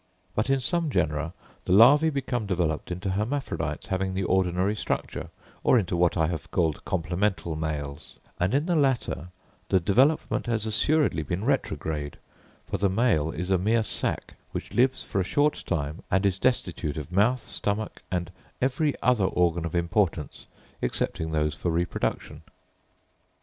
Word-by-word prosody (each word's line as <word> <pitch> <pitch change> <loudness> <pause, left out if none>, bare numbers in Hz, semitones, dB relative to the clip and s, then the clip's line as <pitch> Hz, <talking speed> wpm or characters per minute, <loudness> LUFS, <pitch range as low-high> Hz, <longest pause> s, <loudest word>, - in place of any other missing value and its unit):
But 110 +5 0
in 135 0 +3
some 165 +5 0
genera 75 - 0 0.3
the - - +2
larvæ 145 +10 +7
become 125 -6 -2
developed 85 -5 -1
into 90 +2 -3
hermaphrodites 115 +9 -2
having 95 0 -1
the 95 - 0
ordinary 95 +2 +1
structure, - - -3 0.3
or 125 - +5
into 95 -5 0
what 85 +1 +2
I 80 - +3
have 80 -2 -4
called 80 -4 0
complemental 90 0 -1
males; 75 -1 -4 0.2
and 90 +8 +1
in 145 +3 +2
the 175 -1 +1
latter 130 - +1 0.4
the 95 - +4
development 130 - +2
has 115 -2 0
assuredly 125 - +2
been 90 +7 -3
retrograde; 80 - -1 0.5
for - - -3
the 100 - +3
male 95 -7 +2
is 90 +4 -4
a 95 - +4
mere 110 +4 +2
sack, - - -2 0.2
which - - -5
lives 130 +2 +2
for 95 - -1
a - - +1
short 145 +10 +1
time 75 -1 -2
and 95 +2 +2
is 95 -1 +1
destitute 90 - 0
of 75 +2 -6
mouth, 110 +7 +2
stomach, 105 +1 -3
and 90 -1 -2 0.3
every 135 +3 +1
other 125 -6 +3
organ 85 -2 +1
of 85 - -4
importance, 85 -3 0 0.3
excepting 80 +5 -1
those 75 -1 0
for 85 - -2
reproduction. 85 +1 -2
95 Hz, 155 wpm, -27 LUFS, 85-120 Hz, 0.5 s, larvæ